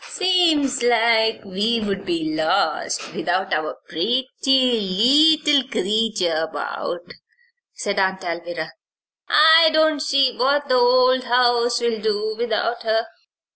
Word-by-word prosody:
"Seems 325 - +1
like 230 -2 +1
we'd 200 0 -2
be 320 -2 -2
lost 310 - -2
without 190 - -2
our 155 0 -3
pretty 245 +10 -2
leetle 265 +4 +2
creetur 210 -7 -1
about," - - -6 0.6
said 200 -3 -3
Aunt 190 0 -1
Alvirah. 170 -1 -6 0.6
"I 320 +1 +6
don't 315 -1 +2
see 275 -4 +1
what 285 +3 0
the - - +2
old 255 +1 +3
house 240 0 +1
will 230 -2 -2
do 215 0 -2
without 235 +1 -2
her." 225 0 -1
240 Hz, 110 wpm, -20 LUFS, 210-285 Hz, 0.6 s, I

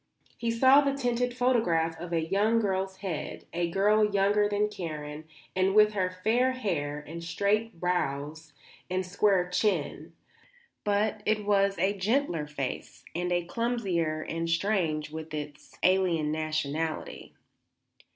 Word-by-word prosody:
He 235 - -2
saw 260 +5 +6
the 275 -1 0
tinted 245 -2 0
photograph 180 -11 +2
of 175 0 -7
a 165 -1 0
young 210 +6 +2
girl's 190 -2 -1
head, 170 -5 -4
a 170 0 0
girl 210 +4 +3
younger 205 0 +2
than 205 0 +1
Karen 155 -6 -6 0.3
and 190 +1 +2
with 215 0 +6
her 185 -3 0
fair 250 +4 +3
hair 150 - -3
and 170 +2 -7
straight 205 +3 0
brows 160 -3 -2 0.4
and 185 0 -1
square 190 -1 +2
chin; 180 -4 -1 0.7
but 210 +1 0
it 215 -1 +1
was 200 -1 +2
a 190 +4 +1
gentler 200 - 0
face 140 -3 -5
and 180 +1 -2
a 175 -1 +1
clumsier, 180 -8 -1
and 165 0 -2
strange 165 -4 0
with 160 0 -6
its 150 -1 -8
alien 180 -5 +3
nationality. 155 0 -3
185 Hz, 135 wpm, -28 LUFS, 160-210 Hz, 0.7 s, saw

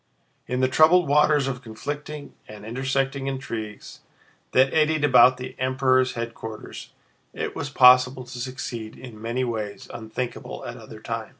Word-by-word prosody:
In 125 0 -1
the 130 - +4
troubled 160 +6 +5
waters 150 -1 +3
of 125 -2 -4
conflicting 145 +6 -7
and 105 -1 -11
intersecting 135 +3 -1
intrigues 115 -6 -6 0.5
that 130 +1 +4
eddied 155 -1 +2
about 130 -2 +6
the 125 - -7
Emperor's 130 0 +2
headquarters, 115 -2 -7 0.5
it - - -4
was 145 - -4
possible 125 0 +6
to 125 0 -9
succeed 120 -3 -6
in 115 -4 -11
many 120 +3 -2
ways 110 -4 -4
unthinkable 120 +2 -6
at - - -6
other - - -11
times. - - -4
130 Hz, 140 wpm, -24 LUFS, 115-135 Hz, 0.5 s, about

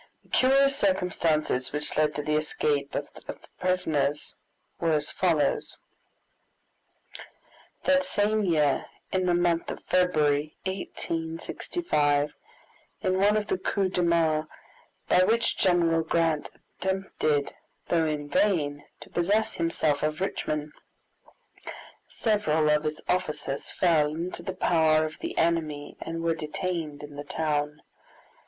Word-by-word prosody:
The - - -26
curious 275 +1 +4
circumstances 165 - +1
which 150 +1 -3
led 155 -1 +2
to 150 - -2
the 150 +1 0
escape 150 -2 -1
of - - -2
the - - -9 0.2
prisoners 160 -6 0 0.4
were 165 -1 +2
as 150 -1 0
follows: 160 -6 +1 2.1
That 280 0 +4
same 215 -1 +1
year, 150 -6 +2 0.2
in 185 -1 +1
the 175 - +3
month 175 -1 +1
of - - -6
February, 155 -5 +2
1865, 165 - -1 0.7
in 185 -2 +1
one 205 +2 +4
of 210 - -1
the 185 - -1
coups 190 0 0
de 180 - +1
main 160 -2 +2 0.6
by - - +4
which 230 +5 +2
General 170 -3 +3
Grant 160 -2 0 0.3
attempted, 190 -6 -1 0.4
though 165 -2 +2
in 150 -1 -3
vain, 145 -6 +1 0.2
to - - -10
possess 205 +6 +1
himself 160 -3 0
of 155 0 -1
Richmond, 150 -5 -2 1.4
several 160 -9 +1
of 150 +1 +2
his 155 0 -3
officers 150 -6 -2
fell 155 -4 +2
into 170 +3 -4
the 190 - -5
power 160 -3 +3
of 155 - -7
the - - -5
enemy 155 -3 0
and 165 0 -4
were 165 0 +2
detained 155 -1 -4
in 145 -1 -9
the 145 - -5
town. 150 -1 -2
165 Hz, 125 wpm, -27 LUFS, 150-185 Hz, 2.1 s, curious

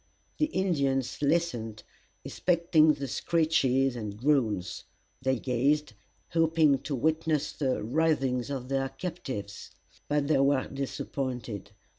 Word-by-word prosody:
The 305 - +3
Indians 140 - 0
listened, 140 -9 0 0.4
expecting 170 -3 +3
the 140 -1 -5
screeches 135 -4 +1
and 105 -3 -5
groans; 115 -8 0 0.4
they 130 0 +1
gazed, 135 +3 +1 0.4
hoping 160 -4 +3
to 145 - -4
witness 155 +2 0
the 130 -6 -1
writhings 135 -1 +1
of 130 -3 -4
their 135 -1 0
captive. 130 - -6 0.4
But 145 -1 +1
they 150 -3 +3
were 135 -1 +2
disappointed. 125 -6 -4
135 Hz, 110 wpm, -29 LUFS, 125-155 Hz, 0.4 s, The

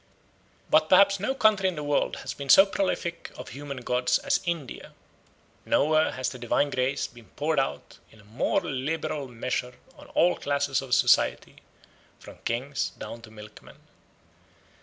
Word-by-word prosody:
But 155 0 +4
perhaps 200 +1 +5
no 240 +8 -1
country 210 -6 +3
in 180 - -6
the 150 - -5
world 145 -1 0
has - - -5
been 140 -1 -8
so 195 - +9
prolific 185 -3 -3
of - - -8
human 140 0 -7
gods 125 0 +1
as - - 0
India; 165 -7 -5 0.7
nowhere 155 +1 +2
has 130 -1 -2
the 125 - -9
divine 130 +4 0
grace 130 +2 0
been 120 -2 -13
poured 150 0 0
out 135 - -4
in 110 - -20
a - - -18
more 110 +5 -1
liberal 145 +1 -3
measure 125 +1 -4 0.2
on - - -15
all 175 +1 +4
classes 140 -2 0
of 130 -2 0
society - - +2 0.6
from - - -13
kings 130 +4 -2
down 115 - -8
to 110 - -13
milkmen. 105 -1 -14
140 Hz, 160 wpm, -26 LUFS, 125-160 Hz, 0.7 s, so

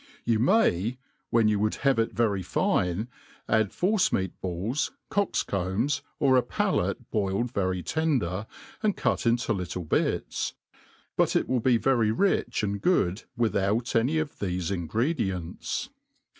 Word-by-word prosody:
You 115 -2 +2
may, 120 - +2 0.3
when 115 -2 +4
you 105 -1 +2
would 105 +1 +1
have 135 -4 +4
it 115 - +1
very 105 -3 +1
fine, 90 +3 0 0.4
add 110 -3 +2
force 190 +1 +2
n^at 95 -2 0
balls, 95 - -1 0.2
cocks 200 0 +1
combs, 100 +9 -1 0.2
or 130 -2 +4
a - - +5
palate - - -1
boiled 105 +3 0
very 95 -4 -1
tender,' 115 - 0 0.3
and 215 -3 +1
cut - - 0
into 120 0 +2
little 90 -2 -4
.bits; 75 - -1 0.6
but - - +2
it - - +2
will 130 - +1
be 120 +1 +3
very 115 -1 +2
rich 195 - +1
and 100 -1 -2
good, 100 - +1
without 115 +1 +1
any 125 +8 +2
of 155 -2 -1
thefe 90 -2 -2
ingredients. 95 - -2
110 Hz, 145 wpm, -27 LUFS, 95-130 Hz, 0.6 s, a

